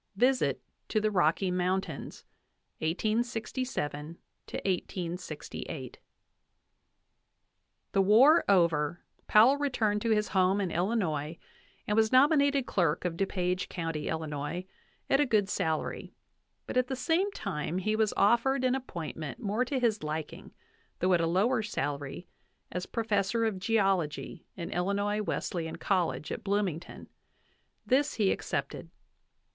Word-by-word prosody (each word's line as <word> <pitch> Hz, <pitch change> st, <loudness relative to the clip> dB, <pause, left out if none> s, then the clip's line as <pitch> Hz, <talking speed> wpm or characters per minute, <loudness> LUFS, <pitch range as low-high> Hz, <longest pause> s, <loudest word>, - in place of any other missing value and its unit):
VISIT 250 Hz, +5 st, +2 dB, 0.3 s
TO 215 Hz, -, +2 dB
THE 215 Hz, 0 st, 0 dB
ROCKY 180 Hz, 0 st, +2 dB
MOUNTAINS, 180 Hz, -3 st, -2 dB, 0.6 s
1867 215 Hz, -, -2 dB, 0.3 s
1868. 175 Hz, -7 st, -4 dB, 1.9 s
The 195 Hz, -, +3 dB
war 245 Hz, -, +6 dB
over, 170 Hz, -4 st, +2 dB, 0.3 s
Powell 235 Hz, +7 st, +6 dB
returned 225 Hz, -8 st, 0 dB
to 230 Hz, -, -1 dB
his 210 Hz, -1 st, +2 dB
home 190 Hz, +1 st, +3 dB
in 190 Hz, -4 st, -1 dB
Illinois 170 Hz, -5 st, -1 dB, 0.5 s
and 210 Hz, -, 0 dB
was 220 Hz, 0 st, +3 dB
nominated 280 Hz, 0 st, +4 dB
clerk 170 Hz, -6 st, 0 dB
of 175 Hz, -2 st, -1 dB
Du 195 Hz, +3 st, 0 dB
Page 180 Hz, -1 st, -1 dB
County, 165 Hz, -4 st, -3 dB
Illinois, 160 Hz, +2 st, -3 dB, 0.4 s
at 275 Hz, -, +3 dB
a 295 Hz, -, +4 dB
good 210 Hz, -4 st, +2 dB
salary; 160 Hz, -5 st, -2 dB, 0.5 s
but -, -, -3 dB
at 255 Hz, 0 st, +3 dB
the 265 Hz, -, -2 dB
same 335 Hz, +9 st, +1 dB
time 175 Hz, -, -3 dB
he 215 Hz, +3 st, 0 dB
was 215 Hz, -1 st, +2 dB
offered 240 Hz, +5 st, +3 dB
an 255 Hz, -1 st, +3 dB
appointment 160 Hz, -, -5 dB
more 210 Hz, +4 st, 0 dB
to 260 Hz, +2 st, -2 dB
his 225 Hz, -4 st, +1 dB
liking, 155 Hz, 0 st, -5 dB, 0.5 s
though 185 Hz, +1 st, +2 dB
at 170 Hz, -, +3 dB
a 165 Hz, -, +1 dB
lower 215 Hz, +8 st, +2 dB
salary, 145 Hz, -5 st, -4 dB, 0.4 s
as 180 Hz, 0 st, -4 dB
professor 220 Hz, 0 st, 0 dB
of 210 Hz, -4 st, -1 dB
geology 195 Hz, -7 st, 0 dB
in 170 Hz, -, -6 dB
Illinois 200 Hz, +3 st, 0 dB
Wesleyan 170 Hz, -5 st, -3 dB
College, 180 Hz, -5 st, -1 dB
at -, -, -5 dB
Bloomington; 195 Hz, -5 st, -2 dB, 0.8 s
this 280 Hz, +3 st, +2 dB
he 205 Hz, -4 st, +2 dB
accepted. -, -, -3 dB
195 Hz, 125 wpm, -30 LUFS, 170-230 Hz, 1.9 s, war